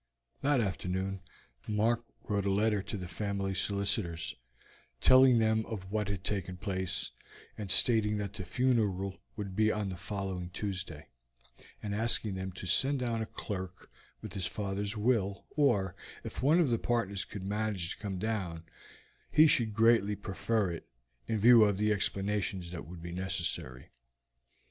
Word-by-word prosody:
That 140 Hz, -2 st, +3 dB
afternoon 95 Hz, -1 st, -2 dB, 0.5 s
Mark 115 Hz, +3 st, +1 dB, 0.2 s
wrote 100 Hz, -2 st, -1 dB
a -, -, +2 dB
letter 105 Hz, +1 st, +2 dB
to 105 Hz, -, -5 dB
the 90 Hz, -2 st, -6 dB
family 100 Hz, +1 st, -2 dB
solicitors, 100 Hz, -3 st, 0 dB, 0.6 s
telling 130 Hz, -, +7 dB
them 110 Hz, 0 st, +3 dB
of 95 Hz, -4 st, -6 dB
what 105 Hz, -1 st, 0 dB
had 100 Hz, -2 st, -3 dB
taken 95 Hz, -2 st, -3 dB
place, 95 Hz, -3 st, -2 dB, 0.4 s
and 105 Hz, -3 st, -6 dB
stating 105 Hz, +2 st, +4 dB
that 100 Hz, -1 st, -3 dB
the 105 Hz, -3 st, -5 dB
funeral 100 Hz, -3 st, 0 dB
would 100 Hz, -4 st, -5 dB
be 110 Hz, +1 st, +3 dB
on 105 Hz, -2 st, -2 dB
the 95 Hz, -, -4 dB
following 95 Hz, -1 st, -4 dB
Tuesday, 95 Hz, -5 st, -4 dB, 0.8 s
and 105 Hz, -1 st, -3 dB
asking 110 Hz, -1 st, +1 dB
them 95 Hz, 0 st, -4 dB
to 95 Hz, -, -7 dB
send 135 Hz, +10 st, +3 dB
down 115 Hz, -2 st, -1 dB
a 110 Hz, -, -3 dB
clerk 95 Hz, -2 st, -6 dB, 0.3 s
with 110 Hz, -4 st, -7 dB
his 95 Hz, -3 st, -1 dB
father's 100 Hz, +1 st, -3 dB
will, 105 Hz, -3 st, +1 dB
or 110 Hz, -, +2 dB, 0.3 s
if -, -, -6 dB
one 150 Hz, +7 st, +5 dB
of 165 Hz, -6 st, +3 dB
the 115 Hz, -, +2 dB
partners 105 Hz, -5 st, 0 dB
could 100 Hz, -3 st, -8 dB
manage 100 Hz, -3 st, -1 dB
to -, -, -7 dB
come 100 Hz, -3 st, -3 dB
down, 90 Hz, -5 st, -2 dB, 0.7 s
he 155 Hz, -, +7 dB
should 120 Hz, -7 st, +4 dB
greatly 110 Hz, -1 st, +4 dB
prefer 100 Hz, 0 st, -1 dB
it, 85 Hz, -, -7 dB, 0.4 s
in 115 Hz, -, 0 dB
view 115 Hz, +2 st, +8 dB
of 100 Hz, -2 st, +2 dB
the 105 Hz, +1 st, +2 dB
explanations 100 Hz, -2 st, -1 dB
that 85 Hz, -2 st, -7 dB
would 85 Hz, 0 st, -9 dB
be 85 Hz, -, -6 dB
necessary. 85 Hz, -8 st, -3 dB
100 Hz, 160 wpm, -31 LUFS, 95-110 Hz, 0.8 s, view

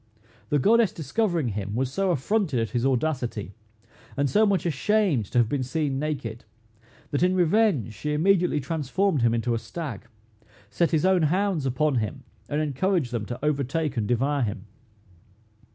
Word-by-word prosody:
The 145 Hz, -, +2 dB
goddess 220 Hz, -, +4 dB
discovering 165 Hz, -, -1 dB
him, 100 Hz, 0 st, -4 dB
was 130 Hz, +1 st, -1 dB
so 195 Hz, +6 st, 0 dB
affronted 170 Hz, -, 0 dB
at 115 Hz, -, -2 dB
his 120 Hz, +1 st, +1 dB
audacity, 125 Hz, -7 st, -1 dB, 0.6 s
and 140 Hz, 0 st, +2 dB
so 210 Hz, +9 st, +3 dB
much 195 Hz, -4 st, +1 dB
ashamed 170 Hz, -, +1 dB
to -, -, -3 dB
have 120 Hz, -2 st, +4 dB
been 140 Hz, +3 st, -1 dB
seen 135 Hz, +1 st, -1 dB
naked, 135 Hz, -7 st, -4 dB, 0.7 s
that 145 Hz, -, 0 dB
in 180 Hz, +1 st, +3 dB
revenge 175 Hz, -, +2 dB
she 150 Hz, +9 st, -4 dB
immediately 180 Hz, -1 st, +2 dB
transformed 155 Hz, +3 st, 0 dB
him 115 Hz, 0 st, +3 dB
into 115 Hz, +1 st, 0 dB
a 115 Hz, -, 0 dB
stag, 130 Hz, -, -7 dB, 0.6 s
set 170 Hz, -, +1 dB
his 160 Hz, 0 st, +1 dB
own 185 Hz, -2 st, +4 dB
hounds 175 Hz, -1 st, +1 dB
upon 135 Hz, +2 st, +1 dB
him, 110 Hz, -3 st, -3 dB, 0.3 s
and 150 Hz, +1 st, 0 dB
encouraged 155 Hz, 0 st, 0 dB
them 115 Hz, -3 st, -3 dB
to 125 Hz, +4 st, -5 dB
overtake 150 Hz, 0 st, -1 dB
and 110 Hz, -3 st, -1 dB
devour 135 Hz, +5 st, +1 dB
him. 110 Hz, -2 st, -3 dB
145 Hz, 165 wpm, -25 LUFS, 120-175 Hz, 0.7 s, goddess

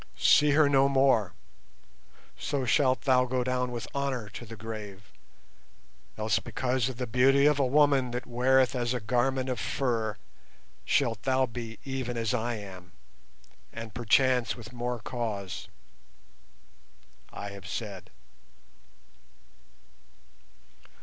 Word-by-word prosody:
See 145 Hz, -, +5 dB
her 155 Hz, 0 st, +5 dB
no 140 Hz, -1 st, +4 dB
more, 130 Hz, -8 st, +3 dB, 1.0 s
so 140 Hz, -3 st, -2 dB
shalt 130 Hz, -1 st, +2 dB
thou 130 Hz, -2 st, +3 dB
go 125 Hz, 0 st, -1 dB
down 125 Hz, 0 st, -1 dB
with 120 Hz, -1 st, -5 dB
honour 135 Hz, -6 st, -2 dB
to 115 Hz, +4 st, -9 dB
the 115 Hz, -, -8 dB
grave. 105 Hz, -2 st, -8 dB, 1.1 s
Else -, -, +1 dB
because 130 Hz, -1 st, -1 dB
of 130 Hz, -, -7 dB
the 125 Hz, -, -2 dB
beauty 135 Hz, +4 st, +4 dB
of 150 Hz, -1 st, +4 dB
a 140 Hz, -, +3 dB
woman 140 Hz, -2 st, +3 dB
that 120 Hz, +1 st, -4 dB
weareth 130 Hz, +2 st, +3 dB
as 120 Hz, 0 st, -1 dB
a -, -, -1 dB
garment 125 Hz, +4 st, 0 dB
of 125 Hz, -1 st, -2 dB
fur 115 Hz, -5 st, -1 dB, 0.7 s
shalt 115 Hz, -6 st, +1 dB
thou 130 Hz, 0 st, +2 dB
be 115 Hz, -2 st, -7 dB
even 130 Hz, -3 st, -3 dB
as 115 Hz, +1 st, -1 dB
I 120 Hz, 0 st, -1 dB
am, 95 Hz, -4 st, -10 dB, 0.8 s
and 115 Hz, -1 st, -8 dB
perchance 125 Hz, +1 st, +2 dB
with 120 Hz, 0 st, -11 dB
more 120 Hz, 0 st, -3 dB
cause. 105 Hz, -5 st, -5 dB, 1.6 s
I 100 Hz, -, -6 dB
have 100 Hz, -1 st, -10 dB
said." 100 Hz, -3 st, -6 dB
125 Hz, 125 wpm, -28 LUFS, 110-130 Hz, 1.6 s, See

